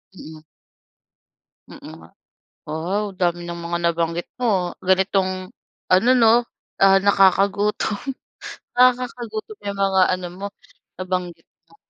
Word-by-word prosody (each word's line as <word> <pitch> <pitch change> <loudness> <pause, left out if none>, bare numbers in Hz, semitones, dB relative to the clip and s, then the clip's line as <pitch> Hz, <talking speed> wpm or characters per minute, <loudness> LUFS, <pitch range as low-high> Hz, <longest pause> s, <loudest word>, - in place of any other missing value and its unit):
Mm. 155 -3 -11 1.3
Mm - - -13 0.2
nga, 80 - -15 0.6
wow, 175 +7 -2
dami 175 -1 0
ng 170 0 -6
mga 170 0 -2
nabanggit 170 0 -1
mo, 190 -7 0
ganitong 185 +1 0 0.4
ano 190 +7 +4
'no, 225 -2 +5 0.5
ah, 195 0 +6
nakakagutom, 200 +1 +2 0.8
nakakagutom 250 - 0
'yong 200 -1 -5
mga 190 -1 +2
ano 180 -1 -3
mo, 200 +1 -5 0.5
nabanggit 180 -3 -4 0.2
mo. 165 - -21
190 Hz, 105 wpm, -21 LUFS, 175-205 Hz, 1.3 s, ah